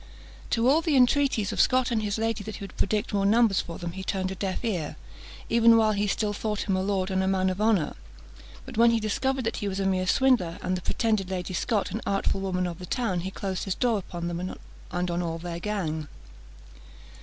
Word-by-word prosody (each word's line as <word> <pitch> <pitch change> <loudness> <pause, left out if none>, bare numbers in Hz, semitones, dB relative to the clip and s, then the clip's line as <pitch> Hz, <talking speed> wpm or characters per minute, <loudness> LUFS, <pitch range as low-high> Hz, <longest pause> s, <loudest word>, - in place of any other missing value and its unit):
To 230 +1 +2
all 295 +5 +5
the 315 -3 +1
entreaties 255 -4 +3
of - - +2
Scot 255 -1 +3
and 225 -2 +1
his 210 0 -1
lady 225 -1 -1
that 215 - -5
he - - -8
would 195 - -9
predict 210 +1 -1
more 200 -1 +1
numbers 215 0 +4
for 170 - -8
them, 175 -2 -5
he 190 +2 -7
turned 190 -1 -2
a - - -2
deaf 190 +4 -3
ear, 175 -9 -2 0.5
even 230 0 +6
while 220 -1 +4
he 205 0 0
still 205 +1 0
thought 210 0 -3
him 195 - +2
a 185 - 0
lord 190 -1 -1
and 190 0 +1
a 190 - 0
man 190 -1 +2
of 185 +3 -4
honour; 215 -7 +2 0.7
but - - -9
when 235 +1 +6
he 230 0 +2
discovered 260 +5 -1
that 225 - -2
he 205 - -3
was 195 0 -3
a 195 - 0
mere 185 -1 +1
swindler, 230 -9 +3
and 185 0 0
the 180 - -4
pretended 215 -1 0
Lady 185 0 -3
Scot 210 +3 0
an 220 - -3
artful 195 0 0
woman 185 -1 -1
of 170 -2 -5
the 180 - -8
town, 225 -7 -1
he 185 +2 -3
closed 190 -1 -4
his 195 - -1
door 235 -4 +1
upon 175 -2 -6
them 170 0 -3 0.5
and 180 0 -2
on 170 +1 -1
all 165 -1 -2
their 170 0 -5
gang. 165 -7 -2
195 Hz, 235 wpm, -27 LUFS, 185-225 Hz, 0.7 s, even